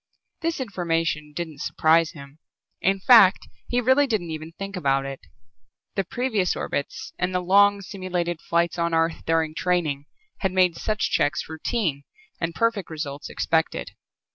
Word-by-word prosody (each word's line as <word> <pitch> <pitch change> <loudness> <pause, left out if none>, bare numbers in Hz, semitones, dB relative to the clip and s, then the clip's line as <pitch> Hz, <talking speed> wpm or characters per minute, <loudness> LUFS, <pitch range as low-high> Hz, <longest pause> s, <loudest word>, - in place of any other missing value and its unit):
This 330 -2 -1
information 165 - -1
didn't 155 -2 -6
surprise 160 0 +3
him, 140 0 -12 0.4
in 195 +1 +2
fact, 200 -2 +6 0.2
he 245 - +1
really 260 +4 +4
didn't 195 -9 -1
even 155 +1 -6
think 195 +3 -7
about 135 -5 +1
it. 135 -1 -6 0.7
The 195 - 0
previous 215 -2 0
orbits 140 - -4
and 180 +1 -1
the - - +3
long 200 +2 +4
simulated 180 -3 -3
flights 170 +1 0
on 170 0 +1
Earth 165 0 +1
during 160 -1 +1
training 155 -5 -1 0.3
had 190 -2 -1
made 180 -2 +3
such 215 +3 -1
checks 145 +4 +1
routine 160 - -2 0.4
and 165 0 -2
perfect 230 -5 0
results 150 -3 -5
expected. 160 -1 -1
170 Hz, 145 wpm, -24 LUFS, 160-195 Hz, 0.7 s, fact